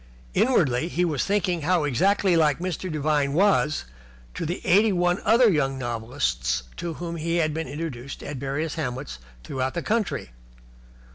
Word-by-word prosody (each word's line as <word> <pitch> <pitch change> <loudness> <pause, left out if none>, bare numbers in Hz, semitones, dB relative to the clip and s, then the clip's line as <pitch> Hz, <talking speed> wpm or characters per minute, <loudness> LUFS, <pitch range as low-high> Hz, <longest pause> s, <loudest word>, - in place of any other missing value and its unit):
Inwardly 160 - +2
he 180 +1 0
was 150 -7 0
thinking 190 -4 0
how 175 +1 +2
exactly 185 - +2
like 150 -4 +3
Mr. 180 0 -4
Devine 145 -2 +1
was 165 - +2 0.5
to 165 - -4
the 175 - -3
eighty 205 +4 +5
one 175 0 +1
other 235 +2 +5
younger 135 -8 +1
novelists 115 - -1
to 170 -2 -4
whom 170 -1 -5
he 165 +1 -1
had 155 -3 +1
been 160 -1 -3
introduced 140 -3 -6
at 145 -1 -5
various 140 +4 -2
hamlets 130 - -4 0.2
throughout 130 - -3
the 170 - -2
country. 215 - -1
155 Hz, 155 wpm, -25 LUFS, 135-180 Hz, 0.5 s, eighty